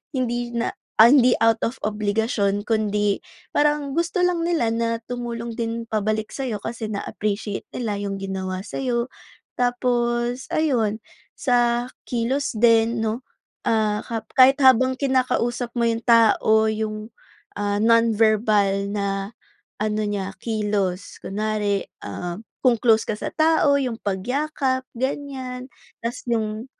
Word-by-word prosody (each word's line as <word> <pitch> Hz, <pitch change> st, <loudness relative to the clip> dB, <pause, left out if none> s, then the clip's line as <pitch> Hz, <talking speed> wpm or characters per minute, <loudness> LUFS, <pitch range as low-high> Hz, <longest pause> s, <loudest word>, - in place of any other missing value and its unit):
hindi 240 Hz, -1 st, -1 dB
na 235 Hz, 0 st, -1 dB, 0.2 s
ay, 225 Hz, +2 st, +8 dB
hindi 250 Hz, -2 st, +5 dB
na -, -, -21 dB
out 225 Hz, -, -6 dB
of 235 Hz, -, -5 dB
obligasyon 210 Hz, -1 st, 0 dB
kundi 210 Hz, -2 st, +1 dB, 0.3 s
parang 295 Hz, -1 st, +2 dB
gusto 340 Hz, +3 st, 0 dB
lang 355 Hz, -2 st, +1 dB
nila 310 Hz, -10 st, +1 dB
na 230 Hz, 0 st, 0 dB
tumulong 235 Hz, -1 st, -4 dB
din 230 Hz, 0 st, -3 dB
pabalik 215 Hz, 0 st, -1 dB
sa'yo, 255 Hz, -6 st, -3 dB
kasi 225 Hz, -1 st, -5 dB
na-appreciate 205 Hz, 0 st, -3 dB
nila 220 Hz, -4 st, -3 dB
'yong 195 Hz, -1 st, -3 dB
ginawa 190 Hz, -1 st, -4 dB
sa'yo. 240 Hz, -3 st, -1 dB, 0.5 s
Tapos 245 Hz, 0 st, 0 dB
ayun, 240 Hz, -9 st, +1 dB, 0.4 s
sa 240 Hz, -2 st, +2 dB, 0.2 s
kilos 245 Hz, +1 st, -1 dB
din, 230 Hz, 0 st, +4 dB
'no? 220 Hz, +4 st, -2 dB, 0.4 s
Ah, 215 Hz, -1 st, +1 dB
kap 225 Hz, -2 st, -4 dB
kahit 265 Hz, +2 st, +7 dB
habang 260 Hz, 0 st, +5 dB
kinakausap 255 Hz, -3 st, 0 dB
mo 235 Hz, -, +2 dB
'yong 230 Hz, 0 st, 0 dB
tao, 220 Hz, -2 st, +4 dB
'yong, 215 Hz, 0 st, -3 dB, 0.4 s
ah, 205 Hz, 0 st, -1 dB
non-verbal 215 Hz, -3 st, +3 dB
na 200 Hz, 0 st, -2 dB, 0.5 s
ano 215 Hz, 0 st, 0 dB
niya, 195 Hz, -1 st, -3 dB
kilos. 205 Hz, -4 st, -2 dB
Kunwari, 205 Hz, -1 st, -1 dB, 0.2 s
ah, 175 Hz, +1 st, -5 dB, 0.3 s
kung 240 Hz, -2 st, +5 dB
close 225 Hz, -2 st, +4 dB
ka -, -, 0 dB
sa -, -, -3 dB
tao, 315 Hz, -3 st, +4 dB
'yong 250 Hz, -4 st, -2 dB
pagyakap, 260 Hz, +6 st, -1 dB
ganyan. 260 Hz, -1 st, -4 dB, 0.3 s
Tapos 235 Hz, +2 st, -5 dB
'yong 220 Hz, 0 st, -1 dB
230 Hz, 130 wpm, -23 LUFS, 210-250 Hz, 0.5 s, ay